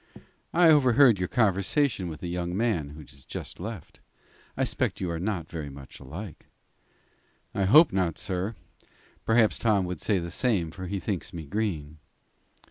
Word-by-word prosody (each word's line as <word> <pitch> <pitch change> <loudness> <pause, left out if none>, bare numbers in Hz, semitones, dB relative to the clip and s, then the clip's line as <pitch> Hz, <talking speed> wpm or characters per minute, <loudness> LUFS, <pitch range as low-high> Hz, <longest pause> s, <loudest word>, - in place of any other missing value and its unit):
"I 170 -1 +5
overheard 130 -6 +6
your 90 - 0
conversation 105 - +1
with 80 - -8
the 90 - -4
young 90 +1 -3
man 100 -11 0
who 75 +2 -10
has 70 -2 -13
just - - -7
left 110 -6 -7
you. - - -33 0.5
I - - +1
suspect - - -1
you 90 -2 -2
are 85 - -3
not 90 -3 -2
very 80 -4 -6
much 70 -1 -12
alike." 80 +7 -9 1.1
"I 100 - 0
hope 150 - +7
not, 90 -4 0
sir. 95 +4 -3 0.7
Perhaps 110 -1 +3
Tom 105 -5 +2
would 90 -2 -5
say 105 - +1
the 85 -1 -4
same, 95 -8 0
for 95 +2 -7
he 100 +2 -3
thinks 95 0 -4
me 80 -3 -6
green." 80 -5 -3
95 Hz, 170 wpm, -27 LUFS, 85-110 Hz, 1.1 s, hope